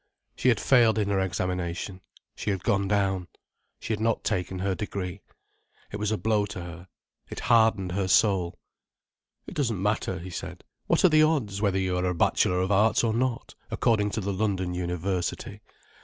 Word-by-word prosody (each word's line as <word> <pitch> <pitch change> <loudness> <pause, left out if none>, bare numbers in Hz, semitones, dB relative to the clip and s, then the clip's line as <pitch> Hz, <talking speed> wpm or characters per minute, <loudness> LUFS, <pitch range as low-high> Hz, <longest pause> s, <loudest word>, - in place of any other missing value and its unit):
She 130 - +2
had 115 -5 +3
failed 120 -4 +4
in 105 -2 0
her 100 -1 +1
examination: 90 0 -3 0.3
she - - -4
had 95 -3 -2
gone 100 0 +1
down: 95 -3 0 0.5
she 110 - -3
had 105 - -2
not 115 0 0
taken 95 0 -2
her 95 +1 -1
degree. 95 -3 -5 0.7
It 105 - -4
was 105 0 -1
a 110 - +1
blow 105 -2 +1
to 100 -2 -7
her. 85 +1 -9 0.4
It - - -6
hardened 110 -5 +3
her 95 +1 -1
soul. 95 -3 +2 0.9
"It - - -9
doesn't 115 -9 -1
matter," 105 -1 -1
he 90 +2 -8
said. - - -7 0.2
"What - - +3
are - - +7
the 155 -1 +5
odds, 130 -11 +1
whether 100 -3 +2
you 95 -1 0
are 90 - 0
a 90 -1 0
Bachelor 90 +2 +2
of 95 +2 -1
Arts 110 +4 +3
or 115 -2 +1
not, 125 0 -1 0.2
according 105 -3 +1
to - - 0
the 100 +1 -2
London 95 -3 -1
University? 90 0 -3
100 Hz, 185 wpm, -27 LUFS, 90-110 Hz, 0.9 s, are